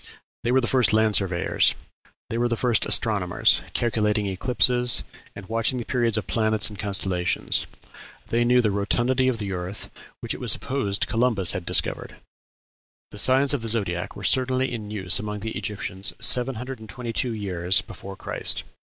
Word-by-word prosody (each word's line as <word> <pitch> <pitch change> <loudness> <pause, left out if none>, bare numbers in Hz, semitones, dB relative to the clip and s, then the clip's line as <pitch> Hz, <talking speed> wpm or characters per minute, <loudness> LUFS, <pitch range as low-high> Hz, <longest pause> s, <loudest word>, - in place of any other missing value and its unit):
They 120 - 0
were 130 +1 +3
the - - -1
first 120 -4 +2
land 110 0 +3
surveyors. 90 -3 +1 0.6
They 115 - -2
were 120 - +2
the 115 -1 -2
first 120 -3 +1
astronomers, - - +2
calculating 105 -3 0
eclipses, 125 +4 +3 0.3
and 100 - -9
watching 115 +3 +1
the 120 - -4
periods 120 -4 +1
of 105 - -2
planets 110 +3 0
and 105 - -11
constellations. 95 -3 -1 0.6
They 120 +1 +1
knew 125 +1 +3
the 105 - +1
rotundity 120 +6 +1
of 130 -3 0
the 100 -3 -4
earth, 90 +3 -6 0.3
which - - -3
it - - -8
was - - +1
supposed 105 -7 -1
Columbus 115 -6 +1
had 90 -2 -6
discovered! - - 0 1.0
"The 105 - -9
signs 135 +4 +4
of 140 - -1
the 115 - -4
zodiac 100 -6 0
were - - -9
certainly 130 0 0
in 110 -4 -6
use 95 -4 +3
among 105 0 -5
the 110 +1 -4
Egyptians 95 -3 -3
1722 125 -1 0
years 95 -4 0
before 95 0 -9
Christ. - - -3
110 Hz, 165 wpm, -24 LUFS, 100-125 Hz, 1.0 s, signs